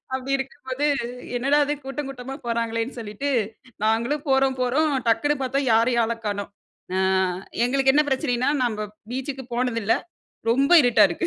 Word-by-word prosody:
அப்டி 265 +1 -4
இருக்கும்போது 265 +1 -4 0.5
என்னடா 275 +4 +2
இது 295 - 0
கூட்டம் 270 +1 -4
கூட்டமா 265 0 -7
போறாங்களேன்னு 230 +1 -2
சொல்லிட்டு, 225 +6 -4 0.5
நாங்களும் 235 +8 +1
போறோம் 265 0 +3
போறோம் 285 +5 +2 0.2
டக்குனு 230 +7 +2
பார்த்தா 265 +1 0
யாரையும் 235 +1 +3
ஆள 230 - 0
காணோம். 205 -1 -2 0.5
ஆ - - +1 0.7
எங்களுக்கு 270 +1 +3
என்ன 300 +2 +5
பிரச்சனைன்னா, 260 -2 +1
நம்ம 215 -3 -1 0.2
பீச்சுக்கு 265 +1 -4
போனதில்ல 230 -3 +1 0.6
ரொம்ப 275 +7 +3
இருட்டா 245 -2 +5
இருக்கு. 350 - -2
255 Hz, 140 wpm, -24 LUFS, 230-275 Hz, 0.7 s, என்ன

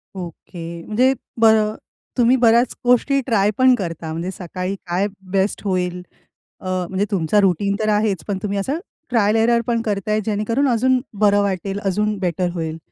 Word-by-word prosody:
Okay. 170 -1 -8
म्हणजे 250 +5 +3 0.3
बर 220 -1 +6 0.6
तुम्ही 245 +1 +5
बऱ्याच 235 +2 +4
गोष्टी 250 +3 +3
ट्राय 210 -4 +2
पण 260 0 +6
करता 165 -6 -5
म्हणजे 170 +4 -3
सकाळी 185 +1 -5
काय 180 +4 0 0.2
बेस्ट 195 +1 0
होईल. 180 -2 -1 0.6
अ, - - -14 0.2
म्हणजे 190 +2 0
तुमचा 195 +2 +2
रुटीन 200 +1 +1
तर 215 -1 0
आहेच, 205 -6 0
पण 200 -2 -1
तुम्ही 200 -1 -2
असं 265 +11 -1 0.3
ट्रायल 215 -3 +2
एरर 235 +1 +3
पण 230 -1 +1
करताय. 210 0 -1
जेणेकरून 225 +6 0
अजून 255 +2 +3 0.2
बरं 205 -1 +4
वाटेल, 195 0 -2
अजून 210 +2 0
बेटर 180 -1 -1
होईल. 160 -2 -4
200 Hz, 160 wpm, -20 LUFS, 185-225 Hz, 0.6 s, बर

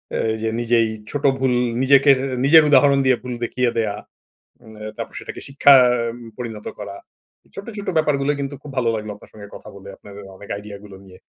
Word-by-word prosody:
আ - - 0 0.2
এইযে 110 0 -3
নিজেই 115 -1 +2 0.2
ছোট 145 0 -4 0.2
ভুল 130 -1 +1 0.3
নিজেকে 140 +1 +4
এর - - -5 0.3
নিজের 160 +2 +7
উদাহরণ 140 0 +5
দিয়ে 130 -1 +3
ভুল 125 -1 -5
দেখিয়ে 125 +1 0
দেয়া, 110 -3 -1 0.7
উম 110 -1 -14 0.2
তারপর - - -7
সেটাকে - - -9
শিক্ষা 140 0 +5 0.4
উম - - -12 0.2
পরিণত 115 -4 -7
করা। 100 -1 -8 0.5
এই - - -28
ছোট্ট, 200 +3 -9
ছোট্ট 205 - -7
ব্যাপারগুলো 145 -2 +1
কিন্তু 140 0 -4
খুব 150 - -10
ভালো 120 -2 +1
লাগলো 105 0 -6
আপনার - - -18
সঙ্গে 100 -1 -12
কথা - - -13
বলে, 100 0 -12
আপনার 100 - -14 0.2
অনেক 100 - -13
আইডিয়াগুলো 100 -1 -11
নিয়ে। 95 -1 -16
120 Hz, 190 wpm, -20 LUFS, 105-140 Hz, 0.7 s, নিজের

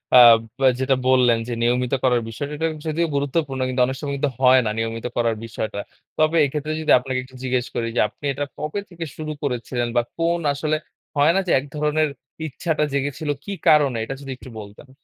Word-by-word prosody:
আব 120 -2 +9 0.3
আ - - +8
যেটা 130 0 +2
বললেন 125 -3 +4
যে, - - -4
"নিয়মিত 125 +2 +1
করার 125 -2 +3
বিষয়।" 130 +6 -4
এটা 160 +2 0 0.2
যদিও 165 +2 0
গুরুত্বপূর্ণ। 140 -1 -1
কিন্তু 125 0 0
অনেক 130 +1 -3
সময় 140 -2 -3
কিন্তু 145 0 0
হয় 130 0 +7
না - - +1
নিয়মিত 115 +1 -3
করার 115 -2 +2
বিষয়টা। 110 -2 -4 0.4
তবে 155 +1 +3
এক্ষেত্রে 150 +2 -3
যদি 155 - +1
আপনাকে 130 0 -3
একটু 130 0 -16
জিজ্ঞেস 125 -1 0
করি 115 -1 -1
যে, - - +1
আপনি 145 - -12
এটা 145 +2 -2
কবে 155 +7 -3
থেকে 170 -2 -6
শুরু 155 -1 -4
করেছিলেন? 120 -2 -2
বা, 120 - +5 0.2
কোন 170 +1 +1
আসলে 155 +2 -1 0.4
হয় 145 +3 +5
না - - +4
যে, - - +1
এক 135 - -8
ধরনের 150 +1 +1 0.4
ইচ্ছাটা 155 +2 -1
জেগেছিল 145 +2 -2
কি 200 - -6 0.2
কারণে? 145 -6 +5
এটা 135 +4 -5
যদি 135 -1 -7
একটু 130 - -12
বলতেন। 105 +6 -12
135 Hz, 200 wpm, -22 LUFS, 125-150 Hz, 0.4 s, আব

